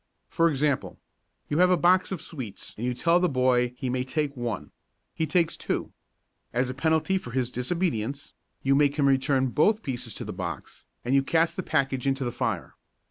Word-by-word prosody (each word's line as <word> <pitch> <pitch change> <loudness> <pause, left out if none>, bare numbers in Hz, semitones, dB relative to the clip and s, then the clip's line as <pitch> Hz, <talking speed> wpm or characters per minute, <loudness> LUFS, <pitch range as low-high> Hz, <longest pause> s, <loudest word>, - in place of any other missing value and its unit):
For 165 0 +3
example: 145 -2 0 0.5
You 150 - 0
have 180 0 +6
a 180 - +4
box 180 +4 +3
of 190 - -3
sweets 125 - -7
and 120 +3 -3
you 125 - -1
tell 170 +6 +3
the 180 0 +2
boy 125 -2 +2
he 130 - -3
may 125 0 0
take 145 +2 -2
one. 120 -5 -4 0.4
He 160 - -1
takes 165 +1 +2
two. - - -3 0.6
As 125 +1 0
a - - -6
penalty 160 +6 +1
for 125 - -9
his 125 0 -1
disobedience 140 - -2 0.3
you 135 - +3
make 145 0 +3
him 145 -2 +3
return 135 -1 +2
both 210 - +2
pieces 120 -5 -4
to - - -5
the - - -5
box - - -6 0.2
and 125 - 0
you 135 - +5
cast 165 +4 +1
the - - -2
package 135 -5 0
into 135 0 +1
the 120 - -1
fire. 115 -7 -2
135 Hz, 195 wpm, -27 LUFS, 125-160 Hz, 0.6 s, have